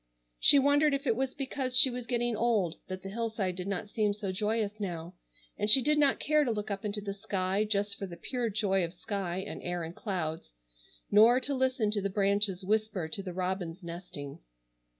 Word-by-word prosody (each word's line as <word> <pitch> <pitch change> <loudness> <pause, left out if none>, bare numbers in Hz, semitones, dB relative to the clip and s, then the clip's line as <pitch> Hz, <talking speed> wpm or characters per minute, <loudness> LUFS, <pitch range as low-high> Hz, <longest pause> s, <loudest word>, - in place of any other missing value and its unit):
She - - +7
wondered 285 +1 +4
if 275 +1 -5
it 230 - +2
was 265 +1 -2
because 265 -2 -1
she 260 0 +9
was 245 -1 -6
getting 240 -1 0
old 210 -7 +1
that 185 0 -6
the 195 - -6
hillside 220 -4 -2
did 180 +1 -5
not 200 +1 -3
seem 210 -2 0
so 205 -2 -4
joyous 210 +2 -1
now, 175 -3 -5 0.5
and 210 +1 0
she 225 - +9
did 300 +3 +2
not 285 -2 +3
care 305 0 +2
to 265 - -1
look 210 -2 -3
up 195 -1 -4
into 210 0 -2
the 200 -1 -4
sky 195 0 -1
just 205 -1 -1
for 195 - -4
the 170 -2 -10
pure 240 +6 -2
joy 195 -2 +1
of 170 +1 -5
sky 185 -2 -4
and - - -7
air 175 -1 -3
and 165 +2 -7
clouds, 160 - -4 0.6
nor 225 +4 +6
to 280 - -1
listen 255 -5 +1
to 210 -1 0
the 200 - -1
branches 200 -1 +1
whisper 215 -4 0
to 195 - -2
the 190 -2 -6
robins 180 -1 -3
nesting. 170 -4 -8
205 Hz, 210 wpm, -30 LUFS, 185-235 Hz, 0.6 s, she